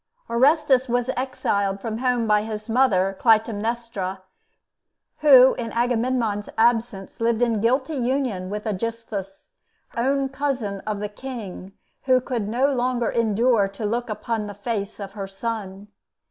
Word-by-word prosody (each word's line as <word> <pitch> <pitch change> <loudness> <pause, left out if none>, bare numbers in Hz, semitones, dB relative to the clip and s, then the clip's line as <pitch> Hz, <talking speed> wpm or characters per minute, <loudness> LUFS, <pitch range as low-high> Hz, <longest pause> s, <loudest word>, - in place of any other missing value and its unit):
Orestes 265 +1 +3
was 245 +1 0
exiled 200 -6 -1
from 220 +2 -4
home 250 -2 +1
by 210 -1 +3
his 215 0 -6
mother 200 -6 +2
Clytemnestra, 220 -3 0 1.0
who 265 -4 +8
in 230 -1 -4
Agamemnon's 235 -3 0
absence 225 -3 +1
lived 230 0 +2
in 230 -3 +1
guilty 260 +6 +1
union 245 -7 -1
with 210 +2 -5
Aegisthus, 215 - -5 0.4
own 270 +3 +1
cousin 265 -8 -2
of 210 -1 -2
the 210 - -2
King, 230 -2 -7
and 190 - -12 0.3
who 255 -1 +5
could 240 -4 -3
no 265 +5 +2
longer 245 -2 0
endure 230 -1 +2
to 195 +2 -6
look 235 +3 -2
upon 215 0 -3
the 205 - -8
face 205 -1 -4
of 195 -1 -6
her 195 -1 -6
son. 200 -1 -5
230 Hz, 140 wpm, -23 LUFS, 205-250 Hz, 1.0 s, who